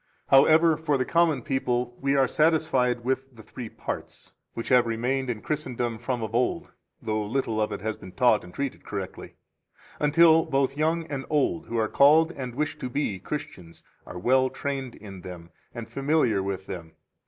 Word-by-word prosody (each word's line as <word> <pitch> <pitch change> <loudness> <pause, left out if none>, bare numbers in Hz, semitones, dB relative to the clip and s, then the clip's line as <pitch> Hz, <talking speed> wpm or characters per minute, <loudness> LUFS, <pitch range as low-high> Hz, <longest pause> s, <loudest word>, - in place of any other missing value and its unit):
6 - - -39
However, 155 +4 +6
for 150 -3 0
the 130 - 0
common 165 -4 +2
people 125 -4 -1
we 140 +1 +1
are 135 -1 +4
satisfied 135 -7 +2
with 130 0 -2
the 110 - -13
three 120 0 -8
parts, - - -7 0.2
which 115 - -5
have 125 -2 +5
remained 125 +3 -1
in 110 -3 -4
Christendom 125 -6 -3
from 125 -1 -3
of 110 0 -5
old, 125 +8 0 0.3
though 110 -1 -1
little 110 0 -1
of 105 - 0
it - - -5
has 110 +1 -3
been 95 - -11
taught 110 +1 +3
and 90 - -12
treated 140 +6 -4
correctly 100 -3 -7 0.6
until 160 +2 +5
both 135 0 0
young 160 +2 0
and 140 -4 -5
old, 150 +2 0
who 115 - -3
are 110 -1 +2
called 155 +6 +5
and 130 -6 -6
wish 150 +2 -2
to 130 - -4
be 125 -8 -2
Christians, 90 - -7 0.2
are - - -8
well 130 +7 +3
trained 135 -3 -4
in 95 -3 -11
them 85 -1 -10 0.2
and 115 -2 -7
familiar 135 -4 +1
with 95 -1 -4
them. 85 -4 -8
130 Hz, 185 wpm, -26 LUFS, 110-145 Hz, 0.6 s, However